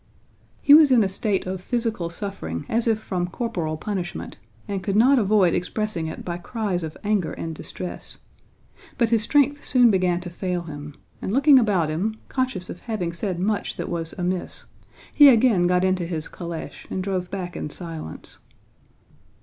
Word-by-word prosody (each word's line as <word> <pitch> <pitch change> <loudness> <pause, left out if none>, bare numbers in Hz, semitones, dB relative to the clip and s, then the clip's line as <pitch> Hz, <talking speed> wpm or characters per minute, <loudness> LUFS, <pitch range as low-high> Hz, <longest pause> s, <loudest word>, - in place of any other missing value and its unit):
He 285 - +7
was 305 -1 +9
in 245 -4 +5
a - - +1
state 195 +1 -1
of 185 0 -4
physical 225 -5 -2
suffering 170 - -5
as 230 +1 0
if 225 -1 +3
from 180 -4 -2
corporal 175 -7 -3
punishment, 180 -1 -4 0.3
and 200 -2 -3
could 195 +1 -2
not 255 +5 +5
avoid 200 -4 +3
expressing 185 -3 -2
it 160 - -7
by 175 -1 -3
cries 200 -2 -2
of 160 -1 -6
anger 205 -5 0
and 165 0 -5
distress. 180 +3 -7 0.8
But 235 -3 +2
his 225 -2 +3
strength 290 +4 +2
soon 245 -3 +5
began 180 -2 +2
to 175 -1 -7
fail 180 0 -3
him, 145 -2 -8 0.3
and - - -3
looking 275 +3 +6
about 195 -9 +2
him, 190 +8 -1
conscious 255 -9 -2
of 175 - -8
having 195 -8 -3
said 175 +1 -3
much 205 +3 -1
that - - -4
was 165 -1 -4
amiss, 180 0 -3 0.5
he 290 -1 +9
again 225 -7 +4
got 180 0 +2
into 185 -2 +1
his 160 -3 -4
calèche 170 -2 -7
and 185 - -3
drove 185 -2 -2
back 180 -3 -5
in - - -4
silence. 160 - -8
185 Hz, 175 wpm, -24 LUFS, 175-220 Hz, 0.8 s, was